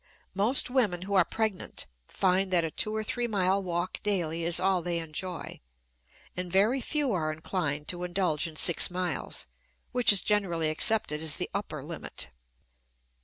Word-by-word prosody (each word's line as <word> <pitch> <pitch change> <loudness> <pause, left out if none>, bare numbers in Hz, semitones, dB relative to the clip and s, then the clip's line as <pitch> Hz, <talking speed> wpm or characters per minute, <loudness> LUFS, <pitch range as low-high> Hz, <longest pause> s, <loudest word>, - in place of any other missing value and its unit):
Most 225 +7 +2
women 205 -9 +1
who 200 +2 -5
are 190 -2 +6
pregnant 215 - -3 0.2
find 190 0 +1
that 175 -2 +4
a 165 - -2
two 215 +6 0
or 220 - -1
three 240 +2 -2
mile 195 -2 +1
walk 175 -1 -3
daily 170 -5 0
is 170 0 +2
all 185 -1 +2
they 170 0 -2
enjoy, 165 +2 -5 0.8
and 180 -1 -5
very 215 +8 +3
few 290 -1 -1
are 155 -4 -1
inclined 155 -2 -3
to 175 0 -2
indulge 175 -3 0
in 160 - -10
six 170 +1 +5
miles, 180 -5 -3 0.5
which 245 -3 +5
is 200 - +5
generally 175 -7 +1
accepted 155 -2 +2
as 160 -2 +3
the - - -3
upper - - -4
limit. 65 - -4
180 Hz, 165 wpm, -28 LUFS, 165-205 Hz, 0.8 s, are